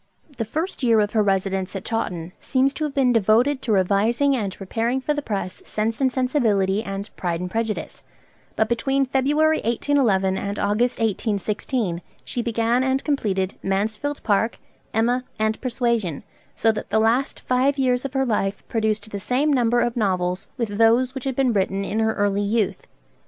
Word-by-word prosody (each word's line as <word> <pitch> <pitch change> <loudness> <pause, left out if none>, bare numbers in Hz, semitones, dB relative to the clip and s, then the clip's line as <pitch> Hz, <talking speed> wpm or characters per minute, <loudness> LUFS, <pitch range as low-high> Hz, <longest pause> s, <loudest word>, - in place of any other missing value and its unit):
The 225 - -1
first 315 - -3
year 230 -3 +4
of 205 -1 0
her 220 - +3
residence 195 -1 0
at 195 +2 -5
Chawton 180 -7 -3
seems 270 +1 +1
to 310 - -2
have 295 - -4
been 260 -3 +3
devoted 235 +6 +3
to 230 - -2
revising 215 +8 +2
and 205 -6 -2
preparing 230 +6 -1
for 280 +3 -1
the 295 - -2
press 195 -7 -4
'Sense 220 +4 -2
and 260 -1 +3
Sensibility,' 220 -7 +1
and 195 0 -5
'Pride 170 -2 -2
and 180 0 -5
Prejudice'; 225 -1 -3 0.5
but 220 - +2
between 270 +4 +1
February 295 +4 +2
1811 220 -6 +1
and 200 +1 -4
August 220 +5 +1
1816, 210 -2 -1 0.2
she 245 - -2
began 235 +2 +1
and 265 +1 0
completed 200 -10 0
'Mansfield 215 +9 -2
Park,' 215 +2 +1 0.3
'Emma,' 240 +3 +1
and 220 0 0
'Persuasion,' 235 - -1 0.3
so 225 - +3
that 215 - -6
the - - +1
last 230 +5 +1
five 260 +3 +1
years 250 -2 +1
of 275 -1 -5
her 270 -1 +1
life 200 -4 -1
produced 220 -1 -1
the 200 - -4
same 270 +8 +1
number 240 -2 +3
of 240 0 0
novels 185 -4 0
with 210 -3 -3
those 235 +3 +4
which 265 -1 -6
had 265 -2 -1
been 260 -3 +2
written 195 0 0
in 215 - -2
her 220 0 +1
early 205 0 +1
youth. 205 0 -1
225 Hz, 175 wpm, -23 LUFS, 200-255 Hz, 0.5 s, year